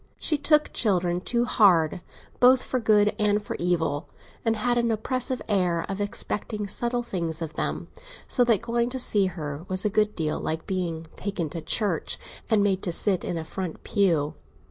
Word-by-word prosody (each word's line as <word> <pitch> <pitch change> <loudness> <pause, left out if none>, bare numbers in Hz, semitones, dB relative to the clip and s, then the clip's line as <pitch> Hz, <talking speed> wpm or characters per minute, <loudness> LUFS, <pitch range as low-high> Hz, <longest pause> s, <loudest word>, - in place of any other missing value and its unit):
She 310 - 0
took 300 +1 +2
children 180 -5 +1
too 240 +4 0
hard, 180 -8 +3 0.4
both 255 +1 +6
for 255 - -1
good 210 -2 +3
and 210 0 +3
for 210 - -6
evil, 170 -3 -1 0.3
and 225 -1 +1
had 240 +2 +1
an 235 0 +1
oppressive 250 +3 -1
air 180 -5 +1
of 195 +1 -4
expecting 210 +1 -2
subtle 240 +4 -1
things 170 -7 -3
of 160 -2 -5
them, - - -3 0.4
so 250 - +4
that 230 -2 +3
going 235 +1 0
to 260 +1 -4
see 205 -5 +4
her 150 -4 -6
was 185 +2 -1
a 210 - +2
good 210 0 +2
deal 155 -2 -1
like 160 +1 -3
being 170 -4 -3
taken 185 -6 -3
to 165 - -4
church 190 +1 0 0.3
and 215 -2 +3
made 195 -2 +1
to 175 - -2
sit 185 +2 +2
in 170 - -3
a 160 - -4
front 180 0 -6
pew. 165 -8 +1
200 Hz, 185 wpm, -26 LUFS, 170-230 Hz, 0.4 s, both